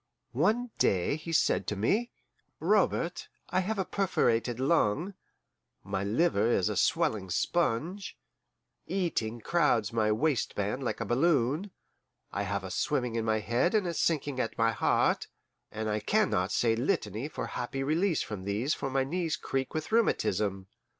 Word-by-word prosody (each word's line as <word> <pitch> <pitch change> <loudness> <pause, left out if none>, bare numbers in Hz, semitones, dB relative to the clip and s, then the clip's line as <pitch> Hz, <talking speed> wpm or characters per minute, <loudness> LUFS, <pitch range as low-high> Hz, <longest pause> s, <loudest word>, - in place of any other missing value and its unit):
One 240 +3 +1
day 95 +8 +2
he 155 +2 -7
said 165 - +2
to 105 - -1
me: 205 - +1 0.5
"Robert, - - +1 0.2
I - - +2
have 205 +4 -1
a 190 - 0
perforated 120 - 0
lung, 150 - +1 0.7
my 95 - -2
liver 110 0 +2
is 95 -6 +2
a - - -2
swelling 95 -4 +1
sponge, 170 - -1 0.7
eating 120 - -1
crowds 120 -9 +1
my 110 -2 +2
waistband 115 -2 0
like 120 - -2
a - - -1
balloon, 140 - +1 0.6
I 100 - -2
have 100 0 -2
a 95 - -6
swimming 125 0 0
in 115 -1 -1
my 110 -1 +1
head 120 - +1
and 210 -3 +2
a 170 - -2
sinking 145 -5 0
at 115 -3 -2
my 115 0 +3
heart, 115 - +1 0.4
and 110 0 -4
I 105 0 0
can 210 - +1
not 90 +2 0
say 115 -2 +2
litany 120 - -1
for - - -5
happy 135 +2 -4
release 165 +4 +1
from 105 -4 -6
these 110 +9 0
for 135 - -3
my 135 0 +1
knees 160 +2 -2
creak 135 0 -3
with 155 +4 -3
rheumatism. 100 - +1
130 Hz, 155 wpm, -29 LUFS, 110-170 Hz, 0.7 s, my